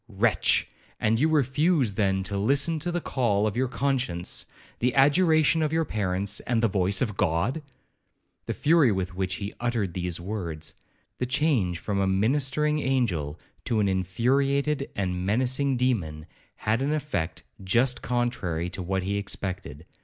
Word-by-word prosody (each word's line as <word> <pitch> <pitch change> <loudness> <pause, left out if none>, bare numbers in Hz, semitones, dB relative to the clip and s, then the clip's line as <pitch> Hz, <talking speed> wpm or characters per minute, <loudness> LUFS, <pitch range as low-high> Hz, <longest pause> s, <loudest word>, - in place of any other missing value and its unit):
'Wretch! 105 -3 +2 0.3
and 110 +1 +2
you 155 +4 +3
refuse, 145 - +2
then, 95 -1 +1
to 100 +2 -4
listen 140 +10 +1
to 175 +4 -2
the 175 - -1
call 115 -9 0
of 110 - -1
your 130 +2 +1
conscience, 125 -8 -2 0.3
the 125 +1 +1
adjuration 155 +3 +4
of 155 -1 0
your 160 0 +1
parents, 100 -3 0
and 115 -1 +1
the - - +5
voice 95 0 +2
of 105 -5 -3
God?' 95 - 0 0.9
The - - -2
fury 155 -5 +4
with 95 -1 -2
which 95 0 -2
he 100 +1 -5
uttered 115 -7 -1
these 90 -1 -3
words,—the 85 +3 -7
change 130 - +1
from 100 +3 -2
a 95 - +2
ministering 135 +9 +1
angel 95 - -1 0.3
to 115 - 0
an 105 - +2
infuriated 135 +10 +1
and 90 -2 -2
menacing 130 +6 +1
demon, 90 -12 -1 0.3
had 110 +3 0
an 145 +2 0
effect 140 - -3 0.2
just 120 +7 +2
contrary 95 -9 -1
to 95 - -5
what 95 +1 -1
he 100 +2 -1
expected. 95 -6 -5
110 Hz, 155 wpm, -26 LUFS, 95-135 Hz, 0.9 s, the